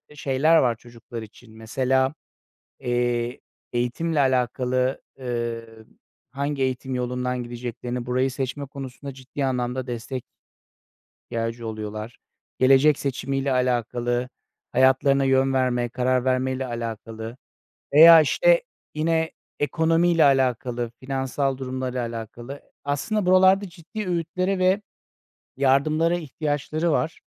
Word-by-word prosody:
şeyler 145 +4 +3
var 125 -6 +3
çocuklar 115 0 -10
için. 110 +1 -14
Mesela, 130 +4 +1 0.7
eee, 120 -1 -1 0.3
eğitimle 125 +7 0
alakalı, 130 0 +1 0.2
eee, 120 -2 -3 0.7
hangi 140 0 -2
eğitim 130 0 -1
yolundan 125 0 -2
gideceklerini, 120 0 -5
burayı 130 +1 +1
seçme 135 +2 -3
konusunda 135 0 -8
ciddi 135 +2 -4
anlamda 125 0 -2
destek 120 +1 -5 1.1
ihtiyacı 115 0 -3
oluyorlar. 110 +1 -6 0.4
Gelecek 135 +3 +5
seçimiyle 135 0 -1
alakalı, 120 -1 0 0.4
hayatlarına 135 +2 +4
yön 135 0 +3
verme, 125 -2 +1
karar 125 +1 0
vermeyle 130 0 0
alakalı 115 -1 -6 0.6
veya, 165 +2 +10
işte, - - +3 0.3
yine 160 +1 +1 0.3
ekonomiyle 165 +3 +3
alakalı, 125 -3 +1
finansal 135 0 -1
durumla 130 -1 -4
da 125 - -1
alakalı. 120 +3 -6 0.2
Aslında 185 +9 -1
buralarda 190 +2 +5
ciddi 185 +5 -7
öğütlere 180 +2 -1
ve 185 +2 +3 0.8
yardımlara 155 +5 +3
ihtiyaçları 155 +1 -2
var. 160 +2 -1
130 Hz, 105 wpm, -24 LUFS, 120-145 Hz, 1.1 s, veya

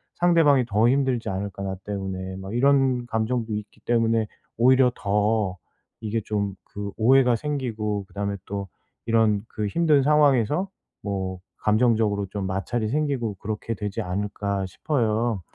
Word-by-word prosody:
상대방이 160 -7 +4
더 110 +1 +3
힘들지 130 -3 +1
않을까? 100 +1 -4
나 95 -1 -3
때문에?' 95 -2 -4
뭐 95 +3 -7
이런 130 -1 +3
감정도 115 0 -1
있기 105 +1 -6
때문에 115 -2 +1 0.3
오히려 130 +2 +5
더 105 -1 0 0.4
이게 110 0 -1
좀 100 -2 -2 0.2
그 100 0 -4
오해가 125 +1 +5
생기고 110 -8 -2
그다음에 100 0 -3
또 100 0 -4 0.4
이런 110 -3 +2
그 105 - -3
힘든 150 +3 +3
상황에서 150 - +3 0.4
뭐 95 -2 -3 0.2
감정적으로 110 -2 +2
좀 100 0 -4
마찰이 105 +4 -2
생기고 135 -6 -1
그렇게 110 +3 -4
되지 105 -1 -3
않을까 100 +1 -2
싶어요. 115 -1 0
110 Hz, 300 characters per minute, -24 LUFS, 100-125 Hz, 0.4 s, 오히려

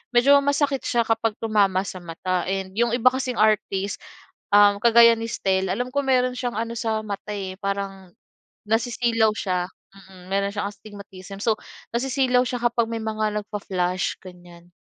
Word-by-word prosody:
medyo 280 +4 +6
masakit 285 -1 +1
siya 235 -1 +2
kapag 225 -1 0
tumama 200 -4 +2
sa 185 - -7
mata 175 +1 -3
and 190 -1 -3
'yong 235 +1 +1
iba 250 +1 +5
kasing 260 -1 -2
artist 205 -2 +1 0.5
kagaya, 220 +3 +6
ah, - - -7
ni 230 - -4
Stell, 190 -3 0
alam 245 +6 -2
ko 285 - 0
meron 255 -1 +2
siyang 245 -2 -3
ano 230 +1 -2
sa 220 -1 -1
mata, 210 0 -6
eh, 190 -2 -5
parang 195 -2 -4 0.5
nasisilaw 230 0 +1
siya, 180 -4 -1 0.3
mm, 190 -2 -15
meron 200 0 +1
siyang 205 -1 -2
astigmatism. 200 -2 -11
So, 225 - +2 0.4
nasisilaw 255 0 +2
siya 245 0 -3
kapag 235 -1 +1
may 225 -1 -3
mga 215 -1 -2
nag-fa-flash, 185 -3 -2
ganyan. 175 -1 -14
210 Hz, 160 wpm, -23 LUFS, 190-235 Hz, 0.5 s, medyo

